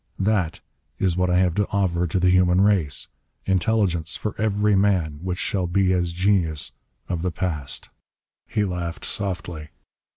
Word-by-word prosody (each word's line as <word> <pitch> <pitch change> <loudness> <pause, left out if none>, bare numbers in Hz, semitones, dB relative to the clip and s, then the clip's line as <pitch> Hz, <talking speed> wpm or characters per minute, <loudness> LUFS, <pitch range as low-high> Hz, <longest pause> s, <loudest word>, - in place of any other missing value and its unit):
That 95 -5 0 0.4
is 95 -3 +1
what 90 0 +1
I 90 - +3
have 90 -2 +3
to 105 +2 0
offer 90 -3 +1
to 90 +3 0
the 90 0 +4
human 90 0 +4
race! 100 -8 +1 0.4
Intelligence 95 -3 +1
for 105 - -3
every 105 -1 +2
man, 90 -7 +1
which 90 0 -3
shall 95 -1 -1
be 95 +1 +2
as 90 -2 0
the 85 - -11
genius 90 -6 +1 0.4
of 85 -2 -2
the 90 - 0
past!" 75 -6 -4 0.6
He 105 - 0
laughed 90 -3 -4
softly. 85 -5 -2
90 Hz, 160 wpm, -23 LUFS, 85-100 Hz, 0.6 s, the